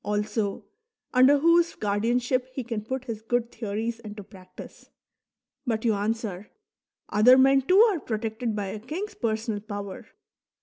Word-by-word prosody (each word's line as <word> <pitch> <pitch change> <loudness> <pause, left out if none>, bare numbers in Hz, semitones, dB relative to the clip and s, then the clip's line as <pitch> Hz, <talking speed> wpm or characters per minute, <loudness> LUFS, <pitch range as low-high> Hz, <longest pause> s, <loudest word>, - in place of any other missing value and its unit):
also, 210 0 -2 0.5
under 260 +3 +6
whose 335 +3 +3
guardianship 240 +5 0
he 260 - -4
can 225 -2 -4
put 260 +3 -4
his 225 -4 -5
good 235 +1 -1
theories 225 +1 -4
into 210 -2 -9
practice. 185 -2 -14 0.7
But 230 -4 -2
you 225 - +3
answer: 210 -2 -3 0.3
" - - -54
Other 225 +5 +6
men 270 +1 +5
too 365 +8 +3
are 430 -7 +4
protected 225 -1 -3
by 200 -2 -3
a 210 +2 -6
king's 325 - -5
personal 220 -2 -2
power." 205 -2 -7
225 Hz, 145 wpm, -26 LUFS, 210-255 Hz, 0.7 s, under